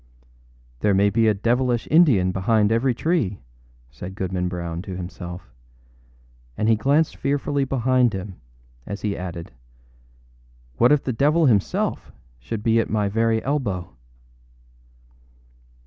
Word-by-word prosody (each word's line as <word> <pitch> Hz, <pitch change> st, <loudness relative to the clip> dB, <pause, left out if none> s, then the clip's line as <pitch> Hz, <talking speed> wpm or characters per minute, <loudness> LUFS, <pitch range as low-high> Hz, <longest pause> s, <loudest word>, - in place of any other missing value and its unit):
âThere 100 Hz, -2 st, +3 dB
may 100 Hz, +1 st, +3 dB
be 115 Hz, +2 st, +2 dB
a 110 Hz, -, +4 dB
devilish 120 Hz, +3 st, 0 dB
Indian 135 Hz, -, +5 dB
behind 105 Hz, +3 st, +1 dB
every 120 Hz, +2 st, +1 dB
tree,â 130 Hz, -, 0 dB, 0.5 s
said 90 Hz, +10 st, -9 dB
Goodman 95 Hz, -2 st, -2 dB
Brown 85 Hz, -1 st, -4 dB
to 95 Hz, -1 st, -7 dB
himself; 90 Hz, 0 st, -8 dB, 1.1 s
and 110 Hz, -, 0 dB
he 115 Hz, -, +5 dB
glanced 140 Hz, +8 st, +1 dB
fearfully 140 Hz, 0 st, -1 dB
behind 130 Hz, -2 st, +2 dB
him 95 Hz, -1 st, -6 dB, 0.5 s
as 100 Hz, 0 st, -5 dB
he 105 Hz, -2 st, -1 dB
added, 85 Hz, -2 st, -7 dB, 1.3 s
âWhat 120 Hz, -, +6 dB
if 150 Hz, -1 st, +3 dB
the 130 Hz, -, -2 dB
devil 150 Hz, +7 st, +3 dB
himself 105 Hz, -8 st, 0 dB, 0.3 s
should 100 Hz, -, -6 dB
be 115 Hz, 0 st, +3 dB
at 115 Hz, -, -1 dB
my 105 Hz, -2 st, 0 dB
very 115 Hz, +1 st, +1 dB
elbow! 100 Hz, -, -2 dB
110 Hz, 130 wpm, -23 LUFS, 95-130 Hz, 1.3 s, âWhat